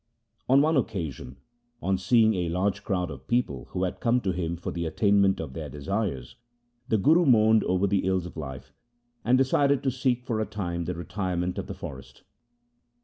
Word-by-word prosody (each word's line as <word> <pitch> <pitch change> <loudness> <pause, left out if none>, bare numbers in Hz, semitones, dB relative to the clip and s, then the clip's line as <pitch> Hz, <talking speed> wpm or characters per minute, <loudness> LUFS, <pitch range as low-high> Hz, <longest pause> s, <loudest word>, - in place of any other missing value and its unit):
On 135 +2 +6
one 160 0 +2
occasion, 75 - -3 0.4
on 95 0 0
seeing 110 +3 +4
a 90 -3 -1
large 95 +3 -1
crowd 90 -5 -1
of 65 -2 -10
people 95 - -1
who 90 - -3
had 90 - -2
come 120 +1 +2
to 95 - 0
him 85 -1 -3
for 85 - -5
the 85 -1 -3
attainment 100 +2 +3
of 80 -5 -6
their 75 -1 -6
desires, 75 - -3 0.5
the 110 - +2
Guru 160 - +4
mourned 110 -5 +5
over 95 +2 +1
the 100 -1 +1
ills 95 -2 +1
of 90 - -9
life, 65 -5 -8 0.5
and 125 +2 +4
decided 140 +1 +2
to 135 - +1
seek 125 -1 0
for 115 -4 -1
a - - 0
time 85 -5 -3
the 90 +1 -3
retirement 90 0 -3
of - - -5
the - - -6
forest. - - -10
95 Hz, 190 wpm, -27 LUFS, 85-115 Hz, 0.5 s, On